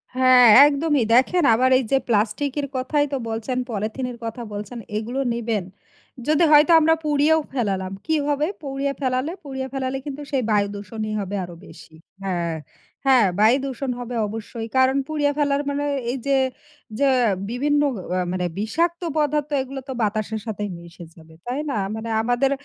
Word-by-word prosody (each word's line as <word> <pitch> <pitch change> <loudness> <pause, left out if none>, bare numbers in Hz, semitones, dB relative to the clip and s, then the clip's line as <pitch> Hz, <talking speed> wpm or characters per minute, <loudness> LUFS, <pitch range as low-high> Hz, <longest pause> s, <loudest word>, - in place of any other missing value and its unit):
হ্যাঁ, 255 -1 +6 0.2
একদমই। 295 -2 +1
দেখেন 290 +8 +4
আবার 255 +3 +3
এই 260 - 0
যে 270 - +5
প্লাস্টিকের 240 +7 0
কথাই 290 +3 +1
তো - - +1
বলছেন, 225 +3 -3
পলিথিনের 235 +4 -3
কথা 230 +2 -5
বলছেন। 210 +4 -6 0.2
এগুলো 240 +5 -3
নিবেন। 225 -4 -2 0.6
যদি 310 +2 +3
হয়তো 300 +3 +6
আমরা 320 +1 +4
পুড়িয়েও 300 +2 +3
ফেলালাম। 195 -6 -2
কি 320 - +1
হবে? 295 +1 +1
পুড়িয়ে 275 -1 -2
ফেলালে, 260 +3 -1
পুড়িয়ে 265 -2 -5
ফেলালে 265 0 -2
কিন্তু 290 0 -6
সেই 265 -3 +1
বায়ু 205 -1 +3
দূষণই 215 +2 -5
হবে 200 0 -4
আরও 175 -1 -9
বেশি। 160 - -14 0.3
হ্যাঁ, 170 -3 -2 0.5
হ্যাঁ 255 -6 +5
বায়ু 220 +5 +5
দূষণ 265 0 -3
হবে 245 0 -5
অবশ্যই। 225 +1 -6
কারণ 260 +1 +4
পুড়িয়ে 295 -2 +1
ফেলার 285 -1 +1
মানে 285 +1 -2 0.3
এই 265 - -3
যে 275 -1 +3 0.6
যে 280 - +4 0.4
বিভিন্ন 290 +4 +1 0.4
আ - - +1
মানে 180 -1 -1
বিষাক্ত 335 - -1 0.2
পদার্থ 300 0 0
এগুলো 270 +1 -6
তো 265 - -2
বাতাসের 215 +1 -1
সাথেই 210 -2 -4
মিশে 170 0 -12
যাবে। 160 -1 -16
তাই 250 +4 -3
না? 225 - -1 0.2
মানে 225 +1 -5
আমাদের 245 +4 +1
255 Hz, 160 wpm, -22 LUFS, 215-285 Hz, 0.6 s, হ্যাঁ